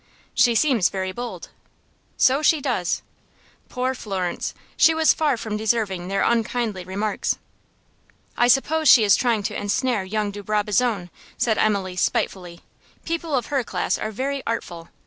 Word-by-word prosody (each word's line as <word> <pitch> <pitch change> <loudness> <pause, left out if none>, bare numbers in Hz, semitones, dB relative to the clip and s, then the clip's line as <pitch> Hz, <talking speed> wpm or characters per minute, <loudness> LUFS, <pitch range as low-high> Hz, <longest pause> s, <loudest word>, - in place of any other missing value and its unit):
"She 240 -1 +3
seems 240 - +3
very 190 -1 -3
bold." 225 -5 -7 0.7
"So 270 +3 +4
she 310 0 +4
does." 245 -11 -1 0.7
Poor 255 +1 -1
Florence! 190 -7 -4 0.2
She 320 - +5
was 320 0 +4
far 295 -5 +1
from 215 -1 -4
deserving 210 -5 -1
their 195 +1 0
unkindly 230 -4 0
remarks. 200 +4 -2 1.0
"I 240 - +3
suppose 295 +4 +3
she 235 - +8
is 200 -2 +5
trying 230 -4 +1
to - - -3
ensnare 210 +1 0
young 210 +2 -2
de 205 0 -8
Brabazon," 210 -2 0 0.3
said 220 -2 +1
Emily, 195 -4 0
spitefully. 175 -1 -2 0.4
"People 330 -2 -2
of 250 +2 -2
her 270 -3 +2
class - - -2
are 215 - -3
very 270 +5 -3
artful. 170 -7 -4
220 Hz, 145 wpm, -23 LUFS, 195-255 Hz, 1.0 s, she